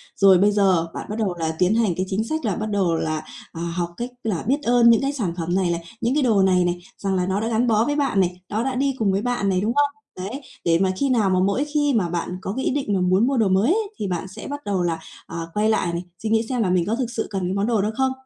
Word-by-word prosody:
Rồi 195 -2 +6
bây 205 +3 +4
giờ, 190 -5 +2
bạn - - -6
bắt 210 - -3
đầu 200 -5 0
là 160 -1 -1
tiến 185 +4 +3
hành 225 -5 +2
cái 185 - 0
chính 200 +3 0
sách 310 +4 -3
là 205 -4 0
bắt 215 0 -3
đầu 190 -5 +1
là, 155 -1 -2 0.3
ờ, 165 - -7
học 170 0 -2
cách 240 +1 -3
là 210 -7 -2
biết 285 +4 +1
ơn 240 0 +5
những 230 - +5
cái 275 +1 -1
sản 210 -12 -2
phẩm 170 +1 -1
này 185 -2 +1
này, 170 0 -3 0.2
những 235 +2 +1
cái 300 - +2
đồ 220 -6 +3
này 185 -1 +3
này, 175 0 -1 0.2
rằng 195 -1 -1
là 180 -1 +1
nó 190 +1 0
đã 220 - -2
gắn 230 +2 +1
bó 220 0 +3
với 290 - 0
bạn 275 -8 +1
này, 180 -1 0
nó 215 +2 -1
đã 265 0 -2
đi 270 +1 0
cùng 205 -3 +2
với 195 +1 0
bạn 245 -4 0
này, 185 -1 +1
đúng 220 +3 0
không? 290 0 +4 0.3
Đấy, 205 +10 -5 0.2
để 165 0 +3
mà 190 0 +2
khi 275 - +1
nào 225 -6 +2
mà 185 -1 +2
mỗi 200 +9 +1
khi 290 -2 +2
mà 195 -7 +1
bạn 170 0 -2
có 190 - -4
cái 265 - -2
ý - - +2
định 270 -6 -1
mà 190 - +1
muốn 185 +6 +3
mua 270 -1 +1
đồ 220 - +3
mới 190 +4 +3
ấy, 425 +1 0
thì 205 - -3
bạn 180 0 -3
sẽ 200 +3 -9
bắt 285 +1 -6
đầu 195 -3 0
là, 165 -2 -1 0.3
ờ, 165 0 -6
quay 210 +1 +2
lại 180 -5 +1
này, 170 +1 -3 0.2
suy 220 - -1
nghĩ 225 +1 +2
xem 250 -2 0
là 190 - 0
mình 180 -2 +2
có 220 - 0
thực 250 -1 -2
sự 225 - -3
cần 195 -2 -3
cái 185 - -1
món 200 +2 0
đồ 225 -4 +2
đó 210 - 0
không? 265 0 +2
205 Hz, 310 wpm, -22 LUFS, 185-240 Hz, 0.3 s, Rồi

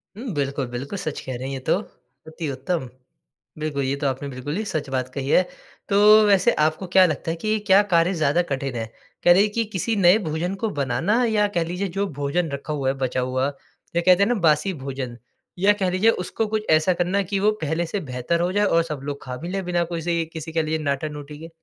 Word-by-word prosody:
हुँ, 235 0 -5
बिल्कुल, 140 -2 -2
बिल्कुल 130 +10 -5
सच 155 -4 -4
कह 130 - -5
रहे 130 +2 -5
हैं 135 - -4
ये 135 - -4
तो, - - +4 0.5
अति 160 -1 -5
उत्तम। 135 0 -3 0.7
बिल्कुल, 145 -3 -2
ये 135 +1 0
तो 140 -1 -1
आपने 135 +2 -3
बिल्कुल 135 +4 -5
ही 220 - -1
सच 150 -7 -3
बात 130 -1 -1
कही 140 0 -4
है, 180 - +6 0.5
तो 210 +1 +7
वैसे 200 +3 +4
आपको 160 +4 -2
क्या 190 -1 +7
लगता 165 0 -2
है - - -2
कि 215 0 +1
क्या 195 +1 +7
कार्य 170 +3 +4
ज़्यादा 155 +1 +2
कठिन 135 -2 -2
है? 115 -1 -2 0.4
कह 175 - +6
रहे 190 - +5
हैं 210 - -1
कि 230 -1 0
किसी 220 +5 -1
नए 190 +1 +6
भोजन 175 +5 -2
को 220 - +2
बनाना 210 - +1
या 210 -2 +2
कह 170 - +2
लीजिए 180 +4 -3
जो 200 0 +1
भोजन 155 +4 0
रखा 140 +2 -4
हुआ 140 -3 -2
है, - - +1
बचा 130 -1 -1
हुआ 130 +1 0 0.5
या 170 - +3
कहते 185 +2 +5
है 215 - +2
ना 245 - +2
बासी 155 +4 +3
भोजन 130 -3 -5 0.4
या 205 +2 +5
कह 190 -3 -1
लीजिए 195 +5 +3
उसको 215 +4 -2
कुछ 215 0 -2
ऐसा 155 +4 +4
करना 180 +3 0
है 200 - +2
कि 195 +2 -2
वो 210 +2 +3
पहले 160 +3 -1
से 200 +5 -3
बेहतर 125 +7 -1
हो 180 +1 +1
जाए 205 0 +3
और 165 -3 +3
सब 150 -4 -5
लोग 140 0 -5
खा 125 -1 -6
भी 170 - -7
लें 195 0 -2
बिना 175 -1 +1
कोसी 170 0 -2
किसी 160 0 -6
के 160 -1 +1
लिए 155 +1 -1
नाटा-नोटी 150 0 -4
के? 165 +1 -9
165 Hz, 240 wpm, -23 LUFS, 140-195 Hz, 0.7 s, तो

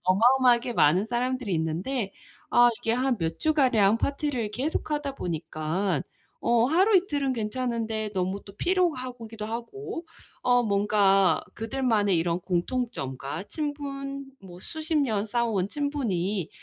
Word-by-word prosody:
어마어마하게 245 +5 +4
많은 180 +3 +4
사람들이 245 -1 -1
있는데 185 +8 -2 0.4
아 240 0 +6
이게 225 - 0
한 250 -2 +1
몇 165 -1 -2
주가량 245 -9 +3
파티를 275 -6 -1
계속하다 290 +2 -2
보니까 165 +1 -2 0.4
어 235 0 +3
하루이틀은 335 - +3
괜찮은데 225 -1 -2
너무 190 +2 -1
또 200 - -12
피로하고 255 -11 0
기도 215 -1 -7
하고 240 - -6 0.4
어 245 -1 +4
뭔가 200 -2 +3
그들만의 225 -4 +1
이런 170 +1 0
공통점과 175 - -2
친분, 275 0 -4 0.2
뭐 180 -2 -12
수십 315 0 -3
년 220 -8 +1
쌓아온 220 -4 0
친분이 210 - -1
230 Hz, 285 characters per minute, -27 LUFS, 195-270 Hz, 0.4 s, 아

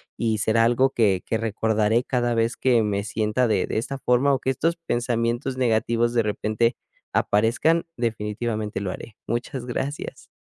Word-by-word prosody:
y 110 -2 0
será 110 +2 +2
algo 120 +3 +3
que 100 -7 +2
que 110 - 0
recordaré 110 +1 +1
cada 120 -2 0
vez 115 0 +1
que 125 -3 +3
me 100 -1 -1
sienta 110 +3 0
de 100 -4 +1
de - - -2
esta 135 +5 -3
forma 130 +2 +2
o 135 - +1
que 130 - 0
estos 165 +6 0
pensamientos 120 -2 -1
negativos 120 -1 +1
de 115 -1 +2
repente 110 +3 0 0.4
aparezcan, 125 +11 +2
definitivamente 110 -2 -2
lo 95 -2 -2
haré. 110 +3 -9
Muchas 120 +1 -3
gracias. 135 +4 -5
115 Hz, 160 wpm, -24 LUFS, 110-125 Hz, 0.4 s, algo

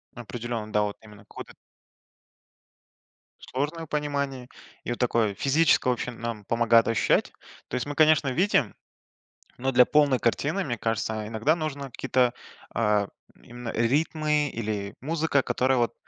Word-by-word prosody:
Определенно 120 -2 -5
да, 105 - +3
вот 105 -1 -3
именно 105 -1 -15
какое-то. - - -10 2.0
Сложное 155 +5 -3
понимании, 140 -4 -3 0.3
и - - -4
вот 120 - -4
такое 115 -4 +1
физическое, 140 +2 +3
в - - +4
общем, 120 0 -6
нам 115 -3 -5
помогает 115 -1 +4
ощущать. 115 - +1 0.4
То - - -4
есть 125 - -1
мы, 145 - -4
конечно, 155 -2 +4
видим, 145 - +1 0.8
но 130 +2 -1
для 125 0 +6
полной 145 -4 +3
картины, 150 +10 0
мне 120 -6 -3
кажется, 110 -1 -2
иногда 115 +9 +1
нужно 140 -5 -5
какие-то, 125 0 +1 0.4
а, 105 -3 +2 0.3
м, - - -24
именно 120 -1 -8
ритмы 150 +5 +1
или 105 -3 -4
музыка. 155 -1 +1
Которая 130 0 +1
вот 120 -1 +1
125 Hz, 140 wpm, -26 LUFS, 115-145 Hz, 2.0 s, для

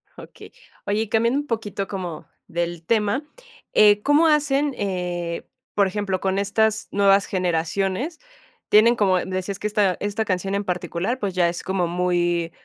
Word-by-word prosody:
Okey. - - -13 0.3
Oye, 205 +2 0
y 220 - -3
cambiando 230 +5 +2
un 290 - -12
poquito 210 -4 -3
como 180 -5 -6 0.2
del 170 0 -3
tema, 215 - +1 0.5
eh, 210 -1 +6
¿cómo 295 +3 +4
hacen, 290 -2 +2
eh, 180 -3 -3 0.3
por 200 - +4
ejemplo, 190 -1 -2
con 190 0 0
estas 220 +2 +1
nuevas 200 0 +4
generaciones? 190 - -1 0.5
Tienen, 225 +3 +6
como 195 -5 +3
decías, 185 +2 -4
que 210 - -1
esta 205 -3 +1
esta 205 +2 -2
canción 195 0 -1
en 200 - -1
particular, 180 +5 -2
pues, 200 -4 -2
ya 175 -2 +3
es 170 - -5
como 190 -2 -1
muy 175 -1 0
200 Hz, 155 wpm, -23 LUFS, 180-215 Hz, 0.5 s, eh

